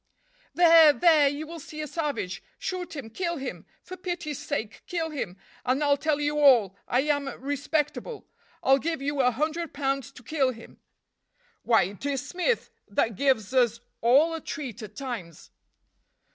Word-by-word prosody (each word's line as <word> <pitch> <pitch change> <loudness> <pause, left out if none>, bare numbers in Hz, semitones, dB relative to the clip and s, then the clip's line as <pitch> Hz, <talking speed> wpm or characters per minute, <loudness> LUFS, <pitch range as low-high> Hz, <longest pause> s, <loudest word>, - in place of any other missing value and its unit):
"There! 330 -3 +8
there! 315 -3 +5
you 290 +2 -5
will 335 +1 -8
see 305 +1 -10
a 305 - -2
savage! 290 - -3 0.2
Shoot 365 -3 -4
him! 250 -6 -7
kill 340 +5 -2
him! 250 - -6 0.2
For 370 - -8
pity's 350 -6 -4
sake 220 -8 -4
kill 330 -3 -2
him, 205 -11 -4 0.3
and 260 +4 +1
I'll 285 -1 +4
tell 300 0 0
you 295 0 0
all! 240 -10 +5
I 250 - +2
am 285 -1 0
respectable. 290 - -2 0.4
I'll 270 +1 +5
give 320 -1 -3
you 285 0 0
a 250 - +4
hundred 310 +6 -2
pounds 275 -2 -1
to 250 - -14
kill 265 -1 +1
him!" 230 - -14 0.8
"Why, 230 -2 +4
it 195 +5 -7
is 275 -2 -2
Smith, 435 +7 -1 0.2
that 210 +2 0
gives 260 -3 +1
us 240 -3 +3 0.2
all 280 +8 +5
a 325 - -4
treat 260 -10 -6
at 210 -1 -9
times." 220 - -7
285 Hz, 165 wpm, -27 LUFS, 250-315 Hz, 0.8 s, There